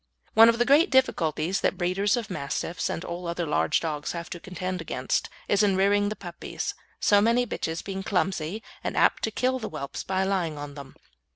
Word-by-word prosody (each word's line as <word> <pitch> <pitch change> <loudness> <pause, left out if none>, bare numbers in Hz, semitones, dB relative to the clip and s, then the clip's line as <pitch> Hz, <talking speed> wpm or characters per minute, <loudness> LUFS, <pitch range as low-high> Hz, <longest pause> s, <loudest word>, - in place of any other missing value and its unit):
One 225 +1 +8
of 230 - +2
the 240 - +2
great 300 +8 +5
difficulties 185 - +1
that - - +1
breeders 195 +4 +1
of 225 -5 -4
Mastiffs 165 +2 -2
and 170 - -4
all 175 +1 -5
other 170 0 -2
large 80 - +2
dogs 150 -3 -3
have 170 -1 -6
to 175 - -5
contend 185 0 -4
against 130 -5 -2 0.2
is 205 - +3
in 200 -2 +3
rearing 205 +1 +3
the 215 - -4
puppies; 175 -4 -5 0.3
so 205 -1 +5
many 235 +3 +3
bitches 165 -7 -3
being 195 -1 -4
clumsy 190 0 -1 0.2
and - - -3
apt - - +4
to - - -1
kill 255 +4 0
the 220 - -5
whelps 140 - -5
by 190 0 0
lying 180 -6 -1
on 145 0 -7
them. 140 -2 -10
185 Hz, 200 wpm, -26 LUFS, 165-205 Hz, 0.3 s, One